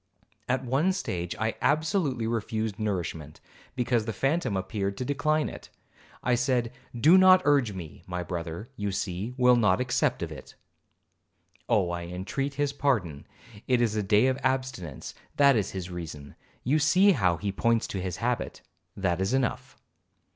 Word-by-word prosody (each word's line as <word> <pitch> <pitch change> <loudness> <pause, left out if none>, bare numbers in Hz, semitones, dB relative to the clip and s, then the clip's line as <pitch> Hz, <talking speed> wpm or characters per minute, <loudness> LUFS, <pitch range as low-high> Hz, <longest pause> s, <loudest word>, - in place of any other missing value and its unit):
At 130 +1 0
one 145 +10 +2
stage 90 - -3
I 110 0 -1
absolutely 155 - +1
refused 110 -2 -2
nourishment, 85 -8 -3 0.4
because 120 -3 +1
the 110 - -2
phantom 135 - 0
appeared 100 +1 -3
to 125 - -3
decline 150 +2 +1
it. - - -9 0.5
I 125 - +2
said, 125 -1 +1 0.3
'Do 165 +9 +7
not 185 0 +7
urge 140 -7 +3
me, 85 -5 -9
my 90 0 -3
brother, 85 +6 -5
you 105 -2 -2
see, 100 +4 -3
will 125 -1 +5
not 105 -5 +3
accept 125 - 0
of 80 - -5
it. 65 -4 -11 1.1
Oh, 100 -7 +2
I 85 0 -4
entreat 100 +11 -4
his 145 0 0
pardon, 105 - -1 0.4
it 125 -2 +3
is 115 -3 +1
a 105 - +1
day 105 +3 +3
of 130 0 +1
abstinence,—that 130 - 0
is 105 -4 0
his 90 -2 -6
reason, 80 -5 -7 0.3
you 145 +6 +2
see 180 +7 +5
how 90 - +2
he 100 +2 -2
points 115 +3 +1
to 95 - -3
his 90 0 -4
habit,—that 100 -6 -3
is 95 +7 +1
enough.' 130 -3 -2
115 Hz, 155 wpm, -27 LUFS, 95-135 Hz, 1.1 s, Do